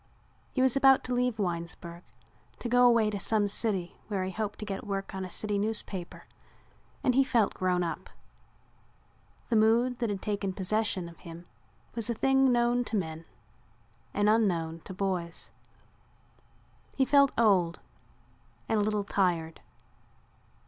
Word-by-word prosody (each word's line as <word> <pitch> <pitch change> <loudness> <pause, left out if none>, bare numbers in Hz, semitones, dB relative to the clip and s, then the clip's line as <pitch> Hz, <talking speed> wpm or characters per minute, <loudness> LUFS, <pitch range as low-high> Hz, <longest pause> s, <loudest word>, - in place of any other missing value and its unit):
He 260 - +1
was 260 -1 +3
about 270 -1 +5
to 255 - -3
leave 245 -2 0
Winesburg 170 -2 -4 0.6
to - - -5
go 245 +1 +5
away 230 -3 +3
to 205 - -4
some 210 0 +2
city 195 -4 -2
where 195 -3 -2
he 185 - -3
hoped 210 +1 -4
to 210 - -6
get 195 -2 -5
work 195 -1 -4
on 190 0 -4
a 185 - -6
city 205 +2 -2
newspaper 205 -4 -2 0.8
and 255 - +3
he 270 +2 +5
felt 235 -6 +1
grown 180 -1 0
up. 170 - -5 1.4
The 235 - +1
mood 235 +3 +3
that 235 -2 -1
had 200 -2 -4
taken 200 -2 -2
possession 200 -1 -1
of 170 -1 -13
him 170 0 -10 0.5
was 230 -1 -2
a 235 - 0
thing 270 +2 +3
known 240 0 +2
to 220 - -2
men 160 -3 -5 0.8
and 205 +1 +1
unknown 175 -7 +1
to 190 - -7
boys. 180 -3 -3 1.4
He 265 - +2
felt 280 0 +5
old 185 -7 +3 0.9
and 220 - +1
a - - +2
little 210 0 0
tired. 175 -5 -1
205 Hz, 150 wpm, -29 LUFS, 185-235 Hz, 1.4 s, about